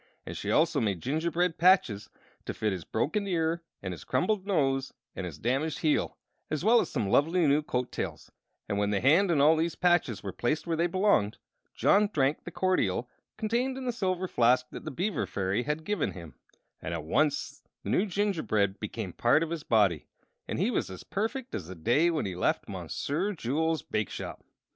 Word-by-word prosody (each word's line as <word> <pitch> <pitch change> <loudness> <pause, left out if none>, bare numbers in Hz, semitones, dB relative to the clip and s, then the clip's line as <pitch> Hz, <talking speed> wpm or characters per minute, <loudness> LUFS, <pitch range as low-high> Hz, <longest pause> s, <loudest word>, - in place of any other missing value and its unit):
Also - - +3
she - - 0
made 100 -5 0
gingerbread 165 - 0
patches 165 - +4 0.4
to - - -4
fit 105 -2 0
his 90 -3 -5
broken 200 - -1
ear 165 -2 0 0.2
and 95 - -3
his 85 - -9
crumbled 200 +1 0
nose 135 -8 0 0.2
and 95 - -4
his 85 - -8
damaged 135 +7 -1
heel, 155 -2 +1 0.3
as 155 +4 -2
well 230 +2 +6
as - - -4
some 115 -8 -1
lovely 160 - +3
new 145 +1 +4
coattails; 125 -4 -4 0.4
and 100 - -1
when 100 0 +1
the 105 -1 +1
hand 165 - +4
and 150 -5 +3
all 155 +2 +6
these 165 +1 -1
patches 175 - +2
were 100 - -4
placed 150 +6 -1
where 165 -1 0
they 170 +2 +2
belonged, 180 - +2 0.4
John 205 0 +4
drank 140 -2 +1
the - - -5
cordial 125 - 0 0.3
contained 240 +4 0
in 265 - -5
the 245 - +1
silver 185 -4 -1
flask 125 -3 +3
that - - -8
the - - -3
Beaver 175 - -2
Fairy 95 +3 -1
had 150 +4 -2
given 205 -6 -1
him, 85 -6 -10 0.5
and 85 - -3
at 80 - -4
once 145 - 0 0.2
the - - -3
new 205 - +2
gingerbread 160 - 0
became 100 -3 -5
a - - -26
part 120 +7 +4
of 165 - -4
his 165 -2 -3
body, 100 - +2 0.4
and - - -3
he - - +1
was - - -1
as 95 - -9
perfect 235 +5 -3
as 90 -6 -4
the 95 - -8
day 120 - +2
he 170 - -1
had 150 - -1
left - - 0
Monsieur 180 +9 -2
Jules' 160 +2 -1
bake 110 - -2
shop. - - -7
155 Hz, 195 wpm, -29 LUFS, 110-180 Hz, 0.5 s, well